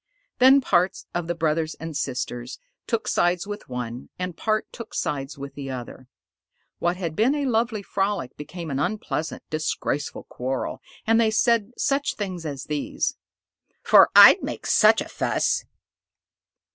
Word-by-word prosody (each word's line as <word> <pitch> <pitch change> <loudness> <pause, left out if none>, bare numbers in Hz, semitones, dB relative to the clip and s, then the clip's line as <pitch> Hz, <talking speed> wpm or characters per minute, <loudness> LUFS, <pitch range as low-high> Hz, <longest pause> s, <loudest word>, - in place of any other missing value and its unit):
Then 265 +2 +7
part 185 -5 +1
of 175 -1 -2
the 175 - -1
brothers 160 -1 0
and 160 -1 -7
sisters 125 -2 -4 0.3
took 230 -1 -1
sides 175 +1 +1
with 205 -5 -7
one, 125 0 -5
and 180 -2 -4
part 215 +5 0
took 230 -2 -9
sides 135 0 -3
with 140 0 -8
the 140 -1 -7
other. 130 0 -7 0.7
What 175 +1 0
had 170 -4 -4
been 235 - +3
a 290 -1 -1
lovely 225 -3 0
frolic 195 -9 -2
became 160 +2 -7
an 135 - -1
unpleasant, 165 -2 -3
disgraceful 155 -2 -2
quarrel, 130 +1 -4 0.2
and 225 +1 +4
they 225 - +3
said 230 0 +2
such 285 0 0
things 185 -5 -4
as 140 -2 -5
these: 150 -1 -2 0.7
"'Fore - - +7
I'd - - +10
make - - -5
such - - +5
a - - -5
fuss!" - - 0
175 Hz, 150 wpm, -24 LUFS, 140-215 Hz, 0.7 s, I'd